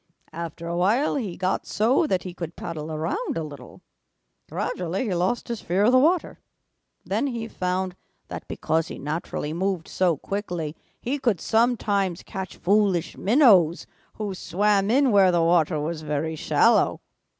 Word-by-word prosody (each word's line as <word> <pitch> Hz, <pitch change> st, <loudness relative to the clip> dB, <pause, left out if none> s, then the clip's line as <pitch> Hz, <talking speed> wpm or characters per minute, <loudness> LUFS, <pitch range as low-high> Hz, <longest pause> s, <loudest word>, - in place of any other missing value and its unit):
After 170 Hz, 0 st, -6 dB
a 170 Hz, -, -2 dB
while 210 Hz, +11 st, +2 dB
he 210 Hz, -11 st, -3 dB
got 185 Hz, +1 st, -1 dB
so 250 Hz, +9 st, +2 dB
that 185 Hz, -7 st, 0 dB
he 180 Hz, -, -6 dB
could 170 Hz, -2 st, -6 dB
paddle 160 Hz, -1 st, -6 dB
around 165 Hz, -, -2 dB
a 165 Hz, -, -2 dB
little. 145 Hz, -2 st, -11 dB, 0.7 s
Gradually 180 Hz, +4 st, -2 dB
he 210 Hz, -7 st, -1 dB
lost 180 Hz, +7 st, 0 dB
his 235 Hz, -2 st, -4 dB
fear 185 Hz, +4 st, +1 dB
of 240 Hz, -, +5 dB
the 255 Hz, -, +6 dB
water. 330 Hz, +5 st, +1 dB, 0.7 s
Then 285 Hz, -, 0 dB
he 235 Hz, -4 st, -4 dB
found 185 Hz, -2 st, -2 dB, 0.3 s
that -, -, -7 dB
because 160 Hz, +1 st, -1 dB
he -, -, -7 dB
naturally 150 Hz, 0 st, -4 dB
moved 185 Hz, -1 st, -2 dB
so 175 Hz, -4 st, +1 dB
quickly 175 Hz, -5 st, -4 dB, 0.2 s
he 275 Hz, +4 st, -2 dB
could 235 Hz, -9 st, +1 dB
sometimes 205 Hz, -6 st, +1 dB
catch 190 Hz, -2 st, -7 dB
foolish 195 Hz, -2 st, +1 dB
minnows 200 Hz, -, +4 dB, 0.3 s
who 210 Hz, -2 st, -4 dB
swam 195 Hz, +3 st, +1 dB
in 265 Hz, +2 st, +4 dB
where 195 Hz, -3 st, +5 dB
the 170 Hz, -1 st, +2 dB
water 165 Hz, -2 st, +3 dB
was 155 Hz, +1 st, -3 dB
very 155 Hz, +1 st, -2 dB
shallow. -, -, +3 dB
185 Hz, 160 wpm, -24 LUFS, 165-215 Hz, 0.7 s, the